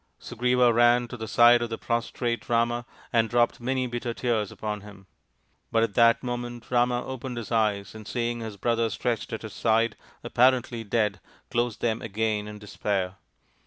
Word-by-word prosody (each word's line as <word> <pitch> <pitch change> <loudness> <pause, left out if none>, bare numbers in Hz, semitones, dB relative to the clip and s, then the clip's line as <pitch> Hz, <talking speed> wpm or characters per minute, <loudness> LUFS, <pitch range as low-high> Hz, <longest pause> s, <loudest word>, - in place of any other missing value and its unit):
Sugriva 125 0 +2
ran 120 +1 +4
to 120 - -7
the 110 -2 -6
side 120 +1 +6
of 120 - -2
the 115 - -4
prostrate 120 0 -2
Rama 120 0 +1 0.3
and 115 -1 +3
dropped 120 0 +2
many 130 +1 0
bitter 120 -1 -4
tears 115 -5 0
upon 105 -1 -4
him. 100 -1 -13 0.7
But 115 0 +3
at 110 -3 -1
that 115 +2 +4
moment 120 -1 -5
Rama 120 0 +2
opened 130 -1 -6
his 120 -1 -6
eyes, 105 -4 +1
and 110 -1 -10
seeing 120 -1 -2
his 110 -3 -6
brother 115 +2 +1
stretched 115 +1 -2
at 110 - -5
his 110 -3 -7
side, 115 0 +2 0.3
apparently 125 -2 +2
dead, 105 -2 0 0.3
closed 120 -2 -1
them 115 -1 0
again 110 -1 -1
in 105 0 -8
despair. 100 -2 -3
115 Hz, 170 wpm, -26 LUFS, 110-120 Hz, 0.7 s, side